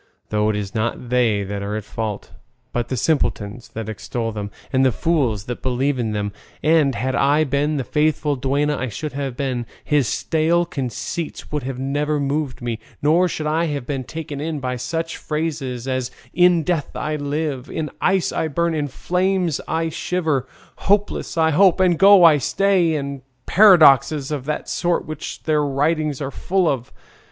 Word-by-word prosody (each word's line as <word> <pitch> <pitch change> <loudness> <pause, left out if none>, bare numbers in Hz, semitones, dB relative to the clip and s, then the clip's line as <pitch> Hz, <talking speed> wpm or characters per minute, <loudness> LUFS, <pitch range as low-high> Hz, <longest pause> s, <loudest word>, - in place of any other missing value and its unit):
Though 105 0 +1
it 110 - 0
is 100 -2 -4
not 120 +2 -2
they 115 -5 +2
that 100 +1 -4
are 100 +1 -3
in 110 - -3
fault, 105 0 -5 0.4
but 120 -1 -1
the 130 - -3
simpletons 120 -6 -1
that 110 -1 -4
extol 115 +2 -4
them, 105 -2 -5 0.2
and 130 0 +3
the 130 - +4
fools 130 - 0
that 125 - -5
believe 130 +2 0
in 115 -2 -1
them; 105 -1 -2 0.3
and 150 -4 +3
had 130 +5 -1
I 145 +4 +3
been 145 +1 0
the 135 - -1
faithful 150 0 +1
duenna 140 +3 0
I 130 - -2
should 150 +7 -5
have 135 -3 -4
been, 125 -4 -2 0.2
his 145 -5 +2
stale 165 +6 +1
conceits 155 +1 -5
would 150 -1 -1
have 130 0 -5
never 145 +3 -1
moved 140 -2 -2
me, 115 -2 -3 0.2
nor 165 +5 +4
should 155 -3 -4
I 160 +2 +1
have 145 -5 -3
been 135 -2 -3
taken 150 0 -6
in 155 -1 -3
by 125 -1 -2
such 165 +7 -3
phrases 145 -6 -3
as 130 -1 -1 0.2
'in 175 -1 +4
death 165 -3 -2
I 155 0 -2
live,' 145 -2 -3
'in 155 -2 -3
ice 190 -1 +2
I 160 - -1
burn,' 170 +3 0
'in 150 -2 -1
flames 180 +2 0
I 165 0 0
shiver,' 155 -6 -1 0.3
'hopeless 205 -3 0
I 160 -1 +3
hope,' 185 +3 +4
'I 185 -1 +5
go 195 +1 +7
and 150 -4 +6
stay,' 185 -3 +2
and 140 -2 -4 0.2
paradoxes 155 - +6
of 140 -4 -3
that 150 0 -3
sort 175 -1 0
which 155 -1 -7
their 155 -1 +2
writings 150 +1 0
are 135 - -4
full 185 +2 0
of. 130 -5 -1
145 Hz, 180 wpm, -21 LUFS, 125-160 Hz, 0.4 s, go